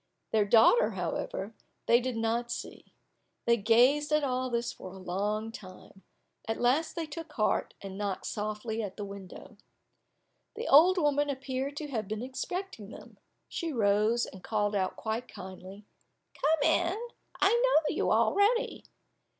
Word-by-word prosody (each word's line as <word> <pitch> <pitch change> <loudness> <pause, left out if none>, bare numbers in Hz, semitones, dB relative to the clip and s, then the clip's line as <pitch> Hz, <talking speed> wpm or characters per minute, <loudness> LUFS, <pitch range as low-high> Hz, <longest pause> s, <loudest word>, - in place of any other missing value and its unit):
Their 215 -2 +3
daughter, 230 - +5
however, 205 +4 -3 0.3
they 235 +1 +5
did 250 -1 -3
not 230 +1 -1
see. - - -6 0.6
They 235 - +5
gazed 245 +7 +4
at 300 0 +3
all 255 -1 -1
this 235 0 -1
for 185 - -10
a - - -10
long 205 +4 -2
time, 195 -2 -12 0.5
at 225 - -2
last 270 +7 +2
they 335 - -2
took 315 0 -8
heart, 215 -6 0
and 195 0 -7
knocked 200 -2 -3
softly 215 +2 -3
at 200 -3 -6
the 205 - -4
window. 195 -2 -10 1.0
The 455 +3 -5
old 345 +7 +7
woman 290 -3 +2
appeared 270 +1 -3
to 305 - -4
have 220 -6 -3
been 215 +2 -4
expecting 265 - -5
them; - - -13 0.3
she 335 -2 -3
rose, 215 0 +2
and 190 - -12
called 210 -1 0
out 190 -2 0
quite 225 +3 -3
kindly, 190 +1 -10 0.5
"Come 305 -1 +1
in,—I 385 +4 -1
know 325 -12 +3
you - - +1
already." 440 +4 +2
235 Hz, 150 wpm, -30 LUFS, 210-295 Hz, 1.0 s, old